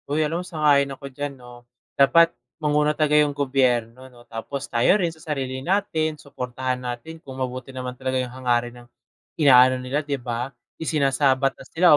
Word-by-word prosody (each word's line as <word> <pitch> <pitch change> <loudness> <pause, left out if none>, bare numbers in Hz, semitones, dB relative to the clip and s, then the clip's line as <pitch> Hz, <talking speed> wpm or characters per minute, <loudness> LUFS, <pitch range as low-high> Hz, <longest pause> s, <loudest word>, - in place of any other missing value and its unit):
Uy, 155 +2 +1
ano 165 +3 -2
sang-ayon 145 -5 +2
ako 140 -2 -10
diyan 145 +1 -4
'no. 125 -1 -13 0.3
Dapat 165 +5 +5 0.2
manguna 150 -1 +1
talaga 150 -1 +2
yung 145 -1 0
gobyerno 130 -3 0
'no, 120 -1 -18
tapos 120 +5 -6
tayo 120 - +3
rin 175 -5 -1
sa 160 - -18
sarili 135 -5 -3
natin 160 -3 0
suportahan 130 -2 -4
natin 125 +7 -6
kung 130 -3 -10
mabuti 130 0 -4
naman 130 -1 -5
talaga 130 +1 -2
yung 125 -1 -3
hangarin 120 -1 -1
ng 120 - -18 0.5
inaano 130 -3 +6
nila 135 +4 -2
'di 140 -2 -3
ba, 120 +2 -4 0.2
isinasabatas 135 -3 +1
nila 170 -2 +6
135 Hz, 165 wpm, -23 LUFS, 125-150 Hz, 0.5 s, inaano